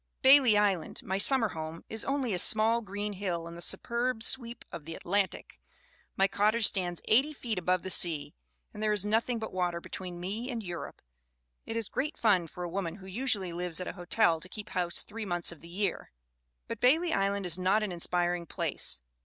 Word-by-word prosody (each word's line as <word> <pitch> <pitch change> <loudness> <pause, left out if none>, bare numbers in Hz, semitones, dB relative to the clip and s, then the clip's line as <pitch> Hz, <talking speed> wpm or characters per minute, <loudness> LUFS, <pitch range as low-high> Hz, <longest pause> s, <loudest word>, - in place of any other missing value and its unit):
"Bailey 260 -5 +7
Island, 195 -6 0
my 190 +1 -2
summer 235 0 +5
home, 160 -1 -6
is 220 0 -2
only 270 -5 -1
a 180 - +2
sma?. 220 +5 +4
green 205 +1 -4
hill 180 -4 -3
in 170 - -8
the 170 - -8
superb 235 +5 +1
sweep 235 -1 0
of 150 - -8
the 165 0 -6
Atlantic. 195 +2 -2 0.6
My 195 - +4
cottage 215 +3 +2
stands 175 -3 +1
eighty 270 +7 +3
feet 230 -8 -3
above 180 +1 0
the 190 - -4
sea, 165 -5 0 0.4
and 210 - -8
there 215 -1 +2
is 205 -1 +1
nothing 225 +3 +1
but 220 -1 -6
water 175 -2 -1
between 180 0 -7
me 210 +8 -4
and 235 -4 -4
Europe. 175 -3 -7 0.6
It 225 - -3
is 225 -2 -2
great 295 +8 -3
fun 190 -7 +3
for 180 +3 -8
a - - -3
woman 175 -2 -3
who 195 -1 -13
usually 195 -3 -1
lives 175 -1 -3
at 180 - -4
a - - -4
hotel 175 -1 +1
to 185 - -11
keep 210 +1 -8
house 175 -2 0
three 225 +1 -7
months 175 -4 +1
of 170 - -12
the 170 - -13
year. 195 +1 -2 0.6
"But - - -5
Bailey 320 +7 +4
Island 200 0 0
is 180 0 +1
not 195 +4 +2
an 210 - -2
inspiring 175 0 -1
place. 65 - -2
195 Hz, 205 wpm, -30 LUFS, 175-225 Hz, 0.6 s, Bailey